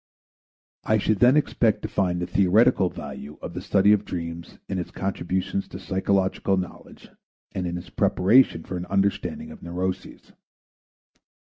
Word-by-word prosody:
I 110 - +2
should 105 -1 0
then 125 +4 +6
expect 115 -6 +1
to - - -1
find 90 -4 0
the 90 - -2
theoretical 100 +1 +3
value 75 -3 -8
of 85 - -7
the 90 - -5
study 100 +1 +4
of 105 -1 +1
dreams 85 -2 -6
in 95 - -2
its 90 - -4
contribution 95 0 -2
to - - -10
psychological 95 0 0
knowledge 90 -1 -7 0.4
and 90 -1 -3
in 85 0 -3
its 90 0 -10
preparation 100 -1 +3
for 90 - -5
an 90 - -6
understanding 100 - -1
of 225 - -12
neuroses. 90 +2 -5
95 Hz, 150 wpm, -24 LUFS, 90-105 Hz, 0.4 s, then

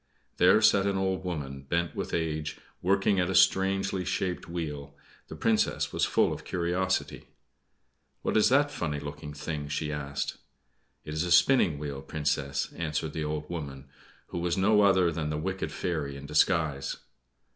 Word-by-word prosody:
There 95 +5 +5
sat 100 -2 +5
an 100 -1 0
old 95 -1 -1
woman, 70 -7 -4
bent 85 +4 -1
with - - -4
age, 80 -2 -2 0.2
working 100 +1 +2
at 90 0 +1
a 95 - -1
strangely 95 0 +3
shaped 90 -1 -2
wheel. 75 -4 -5 0.3
The - - -8
Princess 110 -1 +1
was - - +2
full - - +2
of - - -8
curiosity. 90 +2 -1 1.0
"What - - -1
is 110 - +5
that 145 +3 +3
funny 75 -4 -3
looking 75 +1 -7
thing?" 75 0 -5
she 75 +1 -2
asked. 70 -1 -3 0.7
"It 75 - -5
is 80 +2 0
a 90 - -3
spinning 90 - +5
wheel, 70 -2 -5
Princess," 70 -2 -2
answered 80 -1 -2
the 80 - -2
old 75 0 -3
woman, 70 -5 -6 0.4
who 85 - -4
was 85 +1 0
no 105 +2 +4
other 95 -4 +4
than 80 -2 -3
the 75 - -2
wicked 95 +4 -3
fairy 75 -6 -3
in 70 - -9
disguise. 75 -2 +1
85 Hz, 165 wpm, -28 LUFS, 75-95 Hz, 1.0 s, There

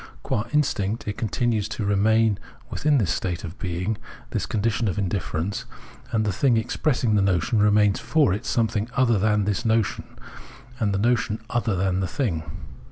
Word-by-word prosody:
Qua 105 - -1
instinct 115 -8 0
it 105 - -2
continues 110 -1 0
to 105 0 -3
remain 105 +1 +3 0.3
within 150 0 +2
this 95 -9 +1
state 90 -2 -3
of 90 +1 -8
being, 90 +3 -2 0.3
this - - -2
condition 110 +1 0
of 95 - -1
in 100 -2 0
difierence; 85 0 -3 0.5
and 110 -1 +1
the 105 - 0
thing 120 +4 +3
expressing 120 0 0
the 105 - +4
notion 95 +4 +2
remains 105 -1 +4
for 150 -12 +2
it 105 +4 -3
something 110 -1 0
other 120 -6 +3
than 105 0 +2
this 105 0 -1
notion, 110 -2 0 0.6
and 105 -4 +1
the 100 - 0
notion 115 0 +1
other 115 -4 0
than 95 0 0
the 95 - 0
thing. 85 - -1
105 Hz, 170 wpm, -24 LUFS, 100-115 Hz, 0.6 s, the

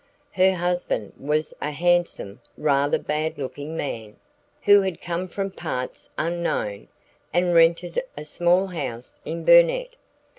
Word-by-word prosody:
Her 190 0 +3
husband 175 - -2
was 150 +2 -1
a 150 - -1
handsome, 170 - 0 0.2
rather 145 -1 +2
bad 155 +1 -2
looking 145 +3 -6
man, 110 -8 -5 0.5
who 205 0 +7
had 190 -3 -3
come 175 +1 -3
from 195 +2 -4
parts 130 -9 -5
unknown, 165 -12 -2 0.4
and 175 0 +2
rented 170 +1 +3 0.2
a 150 - -6
small 175 +4 +2
house 125 -10 -6
in 165 +1 -5
Burnet. - - +5
170 Hz, 125 wpm, -24 LUFS, 145-180 Hz, 0.5 s, who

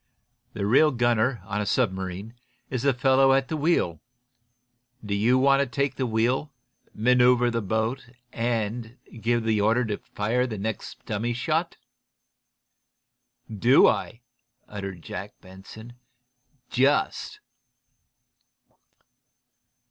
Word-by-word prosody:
The 100 - -3
real 135 +9 +5
gunner, 120 -3 +1
on 105 +1 -3
a - - -2
submarine, 95 -2 -2 0.4
is 125 -2 -2
the 140 +1 +3
fellow 135 +1 +4
at 135 -1 +1
the 160 - -2
wheel. 150 - 0 1.0
Do 105 - -3
you 115 +6 +3
want 135 +1 +4
to 140 - +1
take 140 +1 -1
the 130 - -2
wheel, 120 +6 0 0.4
manoeuvre 125 +1 +3
the 115 0 -1
boat 110 +5 -2 0.3
and 115 0 -3 0.2
give 120 +1 +1
the 110 -2 +1
order 110 0 +1
for 120 +5 -1
the 110 -3 -5
next 110 +2 -6
dummy 115 +4 -2
shot?" 160 +7 -2 1.7
"Do 120 +5 +4
I?" 120 - -1 0.5
uttered 100 -4 -7
Jack 100 +3 -8
Benson. 100 +5 -13 0.8
"Just!" 135 +4 0
120 Hz, 110 wpm, -25 LUFS, 105-130 Hz, 1.7 s, real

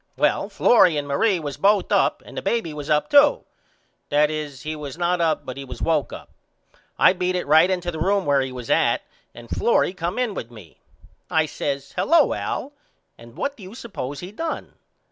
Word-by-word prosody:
Well - - +1
Florrie 180 -9 +4
and 145 -1 -3
Marie 185 +7 +1
was 145 -3 -6
both 200 +5 +2
up - - +2
and - - -12
the - - -3
baby 225 -10 -1
was 150 -1 -7
up 150 0 +2
too 290 0 +5 0.6
that 150 +1 +3
is 150 -3 -6
he 155 0 -4
was 145 -1 -7
not 175 0 0
up 160 -2 0
but 130 +1 -7
was - - -8
woke 155 -6 0
up. - - -10 0.7
I - - +6
beat 180 0 -1
it 180 - -2
right 160 +5 +5
into 180 -2 -1
the 160 - -7
room 195 +3 +1
where 140 -1 +3
he 130 0 -3
was 125 -2 -6
at - - +2 0.3
and 120 0 -11
Florrie 210 - +1
come 180 +1 -4
in 250 -4 0
with 115 - -6
me. 105 -9 -15 0.5
I 160 -1 +2
says 140 -2 -4
Hello 335 +1 +3
Al 285 - -4 0.4
and 115 +1 -16
what 280 - -2
do 225 - -16
you 190 +3 -10
suppose 145 - -6
he 180 +2 -8
done. 325 +9 -5
160 Hz, 200 wpm, -23 LUFS, 145-190 Hz, 0.7 s, I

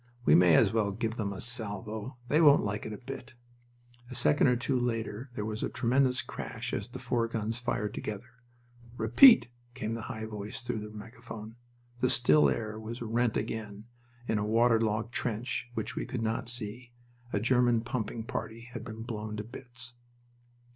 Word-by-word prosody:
"We - - +6
may 90 -2 +7
as - - +5
well 110 -3 +2
give 115 +3 -3
them 100 -3 -1
a 95 - -6
salvo. 110 +1 -1
They 150 +5 +3
won't 145 -3 +7
like 105 +1 -3
it - - -6
a 105 - -5
bit." 125 -2 -9 0.7
A 125 - -7
second 140 +4 +4
or 125 - +4
two 125 +2 0
later 115 0 -2
there 105 - -3
was 110 +1 -4
a - - -1
tremendous 125 +1 +2
crash - - -6
as - - -2
the - - -7
four 115 -1 0
guns 115 0 -2
fired 105 -4 -2
together. 115 +4 -7 0.6
"Repeat!" 120 - +7 0.3
came 110 +1 -3
the 115 - -4
high 110 0 -4
voice 105 +1 -6
through 120 -2 -2
the 105 0 -7
megaphone. 110 0 -9 0.4
The 125 - +2
still 75 -11 +5
air 110 - -3
was 115 +2 -6
rent 115 0 +1
again... 105 -2 -4 0.4
In 110 - +1
a - - 0
waterlogged 115 0 +2
trench, 120 +1 -2
which 110 - -3
we - - -3
could 120 -3 -3
not 115 +1 -1
see, 120 0 -3 0.4
a 105 - +1
German 120 0 +3
pumping 115 -1 -3
party 115 0 -5
had 120 - -5
been 115 -1 -7
blown 110 -2 -5
to 105 - -3
bits. 120 +1 -7
115 Hz, 180 wpm, -30 LUFS, 105-120 Hz, 0.7 s, may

